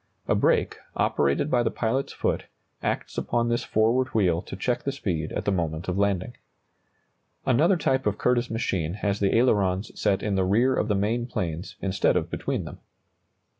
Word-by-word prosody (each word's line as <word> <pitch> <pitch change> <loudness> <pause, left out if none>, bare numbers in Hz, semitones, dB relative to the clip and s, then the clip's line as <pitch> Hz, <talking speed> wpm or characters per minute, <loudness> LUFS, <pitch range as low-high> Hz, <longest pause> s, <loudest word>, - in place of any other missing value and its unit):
A - - +3
brake, - - +2 0.2
operated 70 - +1
by 120 - +3
the 120 - +1
pilot's 130 +5 -1
foot, - - -1 0.4
acts - - -2
upon 120 0 0
this 120 0 0
forward 115 +4 +2
wheel 90 -6 +3
to - - -8
check 120 +6 -1
the 140 - -2
speed 85 - -3
at - - -3
the 100 - +2
moment 80 -3 -2
of 90 - -1
landing. 100 +2 0 1.1
Another 160 +9 +4
type 130 -5 +1
of 105 0 0
Curtiss 125 -1 +1
machine 95 -7 -1
has 100 -1 -1
the 100 -1 +2
ailerons 100 -4 +2
set 100 -2 0
in 105 - 0
the 95 -1 +2
rear 115 +8 +3
of - - 0
the 105 - +1
main 115 +5 0
planes, 85 -5 -4
instead 95 -1 +2
of - - -1
between - - -2
them. - - -9
105 Hz, 180 wpm, -26 LUFS, 95-120 Hz, 1.1 s, Another